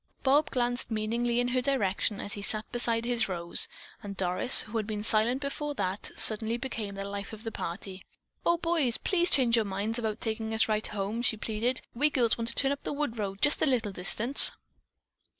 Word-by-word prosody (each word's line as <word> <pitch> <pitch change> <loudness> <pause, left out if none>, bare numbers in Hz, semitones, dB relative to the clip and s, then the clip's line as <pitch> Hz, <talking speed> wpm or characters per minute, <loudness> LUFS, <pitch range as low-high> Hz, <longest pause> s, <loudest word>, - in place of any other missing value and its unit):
Bob 285 +3 +3
glanced 245 -1 -1
meaningly 235 +2 -1
in 245 0 0
her 255 0 0
direction 210 -6 -1
as 200 - -6
he 205 - -7
sat 215 +2 -3
beside 235 -1 0
his 235 -3 +1
Rose, 170 -2 +1 0.3
and 200 -2 -8
Doris, 185 +7 +4
who 225 +1 -6
had 215 -2 -3
been 210 -1 -4
silent 225 +5 0
before 290 +1 -4
that, 190 -3 -2
suddenly 220 +1 +5
became 225 -6 -6
the 195 0 -6
life 200 +1 -7
of 220 0 -10
the 225 - -5
party. 185 0 -6 0.4
"Oh, 340 - +2
boys, 325 -8 0
please 350 -2 +1
change 245 -4 +3
your 225 - +2
minds 205 +4 -3
about 220 -2 -3
taking 220 0 -3
us 220 - +3
right 215 0 0
home," 210 +3 -4
she 230 -2 0
pleaded. 230 +4 -2
"We 290 +6 +2
girls 240 -6 +1
want 230 -1 -4
to 230 - -2
turn 275 -1 +2
up 280 - -4
the - - -5
wood 280 -6 -4
road 195 -1 -5
just 295 - +3
a - - +2
little 235 -6 0
distance." 210 +8 +6
225 Hz, 205 wpm, -28 LUFS, 205-250 Hz, 0.4 s, distance